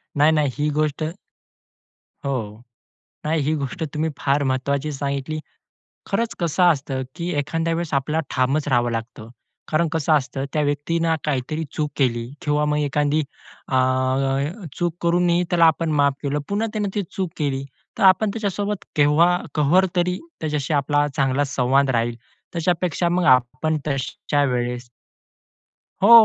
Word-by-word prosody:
नाही, 150 +2 +5
नाही. 150 -3 +2
ही 150 +1 +1
गोष्ट 155 0 0 1.2
हो, 115 -5 -3 0.6
नाही. 155 0 +1
ही 150 +3 +1
गोष्ट 145 +4 -4
तुम्ही 155 +1 0
फार 140 +1 +1
महत्त्वाची 140 +3 -1
सांगितली. 140 +2 -3 0.7
खरंच 225 +3 -1
कसं 170 +1 +1
असतं, 140 -5 +2
की 170 0 -3
एखाद्या 165 +3 -1
वेळेस 165 -2 -3
आपल्याला 145 +4 +1
ठामच 140 +4 +1
राहावं 120 -3 +2
लागतं. 115 -1 -5 0.4
कारण 160 +2 +2
कसं 160 -1 +1
असतं, 135 -1 0
त्या 150 - +2
व्यक्तीने 160 +3 0
काहीतरी 150 +2 -1
चूक 150 -1 -1
केली 120 -4 +1 0.2
किंवा 150 0 +1
मग 150 0 +1
एखादी 150 +1 +1 0.5
अ, 130 - -1 1.0
चूक 175 -2 -1
करूनही 175 0 +2
त्याला 170 -2 +4
आपण 160 0 +2
माफ 140 -2 +3
केलं. 145 +1 0
पुन्हा 210 +3 0
त्याने 210 -2 -1
ती 205 - +1
चूक 190 -4 -2
केली. 140 -2 -1 0.3
तर - - 0
आपण 190 +3 +5
त्याच्यासोबत 205 -1 -2
केव्हा 155 +4 +4 0.2
कहर 155 +6 +4
तरी 180 +1 +1 0.2
त्याच्याशी 150 -1 -1
आपला 145 +1 +2
चांगला 135 0 +2
संवाद 135 +1 +2
राहील. 115 -1 0 0.4
त्याच्यापेक्षा 175 0 0
मग 180 +1 +1
आपण 130 +6 -1
तश्या 145 +1 -1
वेळेस 125 -2 -2 1.1
हो. 225 - +7
150 Hz, 140 wpm, -22 LUFS, 135-170 Hz, 1.2 s, हो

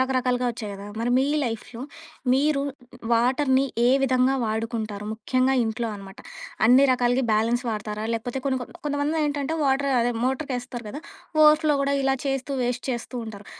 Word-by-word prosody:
రకరకాలుగా 255 -1 +1
ఒచ్చాయి 220 -3 -6
గదా! 200 0 -9
మరి 235 +2 -1
మీ 265 - +3 0.2
లైఫ్‌లో 230 0 -5 0.5
మీరు 280 +1 +2 0.5
వాటర్‌ని 260 +3 +3 0.2
ఏ - - +5
విధంగా 260 0 +3
వాడుకుంటారు? 220 -2 -3
ముఖ్యంగా 255 +3 +1
ఇంట్లో 225 +1 -2
అనమాట. 195 -1 -11 0.5
అన్ని 255 +4 +7
రకాలగి 250 +1 +1
బ్యాలెన్స్ 230 +3 +1
వాడతారా? 210 0 -4
లేకపోతే 235 +3 -3
కొన్ని 265 -1 +1 0.3
కొంతమందేంటంటే 290 0 -1
వాటర్ 275 0 +2
అదే 245 +1 +1
మోటర్‌కేస్తారు 255 -3 -3
గదా. 290 +9 -6 0.4
ఓవర్ 305 0 +7
ఫ్లో 300 -1 +4
గూడా 280 0 +1
ఇలా 270 0 +2
చేస్తూ 270 0 -2
వేస్ట్ 245 0 -2
చేస్తూ 240 +1 -5
ఉంటారు. 205 -2 -9
250 Hz, 145 wpm, -24 LUFS, 230-270 Hz, 0.5 s, అన్ని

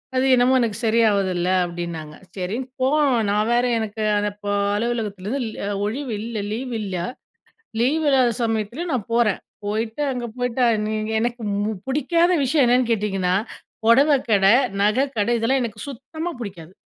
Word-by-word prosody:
அது 255 - +2
என்னமோ 250 +1 +3
எனக்கு 225 -3 -1
சரியா 225 0 +4
ஆவுதில்ல." 185 -2 0 0.2
அப்படின்னாங்க. 170 -3 -6 0.2
சரின்னு 220 +8 -3
போனோம். 275 -1 +3
நான் 210 +2 +1
வேற 245 +1 +3
எனக்கு 220 0 -4
அந்த 205 0 0
ப - - -5 0.3
அலுவலகத்துலேருந்து 220 +1 -2
ல் 205 -1 -4
ஒழிவு 245 +2 -3
இல்ல 230 -1 -4
லீவு 245 +2 -4
இல்ல. 195 -3 -4 0.9
லீவ் 305 +6 +2
இல்லாத 260 -3 +4
சமயத்துலயும் 230 +9 -2
நான் 230 -3 -3
போறேன். 235 -4 +2 0.2
போய்ட்டு 220 +6 -2
அங்க 245 -1 -4
போய்ட்டா, 245 0 0 0.2
நீங்க 215 0 -2
எனக்கு 240 0 -2 0.2
ம் 210 -3 -3
புடிக்காத 335 +6 +2
விஷயம் 275 +1 +3
என்னன்னு 245 0 +3
கேட்டீங்கன்னா, 195 -4 0 0.5
பொடவை 275 +6 +5
கடை, 200 -1 +5 0.3
நகை 215 +7 +3
கடை 210 +3 +1
இதெல்லாம் 260 +4 +1
எனக்கு 215 -2 -5
சுத்தமா 315 +6 -6
புடிக்காது. 180 -6 -8
230 Hz, 150 wpm, -22 LUFS, 205-255 Hz, 0.9 s, பொடவை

